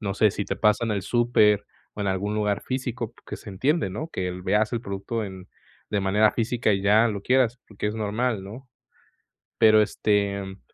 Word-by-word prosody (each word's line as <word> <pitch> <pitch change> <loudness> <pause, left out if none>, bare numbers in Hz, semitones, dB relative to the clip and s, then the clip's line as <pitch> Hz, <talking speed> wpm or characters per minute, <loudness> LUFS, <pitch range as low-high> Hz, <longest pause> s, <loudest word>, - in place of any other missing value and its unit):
No 100 -3 -3
sé 105 +1 +4
si 100 - -3
te - - -3
pasa 105 +2 +2
en 115 - -2
el 100 -2 -1
súper 105 -2 +3 0.3
o - - -7
en 100 - -1
algún 100 +2 -1
lugar 105 -1 0
físico, 125 -3 -4
que - - -6
se - - -12
entiende, 130 - 0
¿no?, 150 - -5
que 95 - -3
el 90 0 -5
veas 105 +4 +1
el 115 - -1
producto 105 +2 -4
en 95 -1 -9 0.4
de 105 - 0
manera 105 +3 +3
física 115 -2 0
y 95 - 0
ya 105 +3 +5
lo 105 -2 -3
quieras, 125 0 +2
porque 105 0 -4
es 105 - -2
normal, 110 0 -1
¿no? 115 +7 -10 0.9
Pero 110 -1 +6
este 100 -2 -1
105 Hz, 200 wpm, -25 LUFS, 100-115 Hz, 0.9 s, Pero